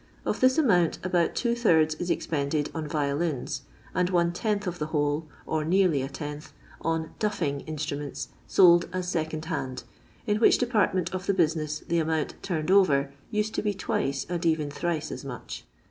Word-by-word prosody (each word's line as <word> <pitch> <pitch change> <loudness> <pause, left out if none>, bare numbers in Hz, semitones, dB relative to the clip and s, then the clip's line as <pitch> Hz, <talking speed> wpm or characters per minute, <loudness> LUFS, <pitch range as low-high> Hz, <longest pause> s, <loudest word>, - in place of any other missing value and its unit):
Of - - -1
this 255 0 +4
amount 180 - +3
about 175 -2 +1
two 235 -1 +1
thirds 160 -10 +3
is 175 +3 -5
expended 145 -2 -1
on 160 -2 -4
violins, 145 -1 -1 0.3
and 180 0 +1
one 170 -1 +2
tenth 210 +2 -1
of 180 -1 -4
the 150 - -2
whole, 150 0 0 0.2
or 155 -1 -1
nearly 175 -3 +3
a 135 - -3
tenth, 150 0 -7 0.3
on 160 -1 -1
" - - -29
duffing 175 -10 -1
" - - -21
instruments 150 -2 -4 0.2
sold 175 -2 +6
as 185 -1 -2
second 160 -2 -2
hand, 140 -6 -3 0.4
in 210 -2 +1
which 220 - +5
depart 235 -6 +2
ment 185 -1 -1
of 185 0 -4
the 200 - +2
business 155 -3 0
the 170 0 +2
amount 160 -1 0
" - - -30
turned 170 -2 -1
over" 140 -8 +4 0.2
used 210 0 -1
to - - 0
be 210 -1 -1
twice, 140 -7 -1
and 175 0 -3
even 160 -3 +1
thrice 165 0 -2
as - - -6
much. 120 - -7
165 Hz, 190 wpm, -27 LUFS, 150-185 Hz, 0.4 s, sold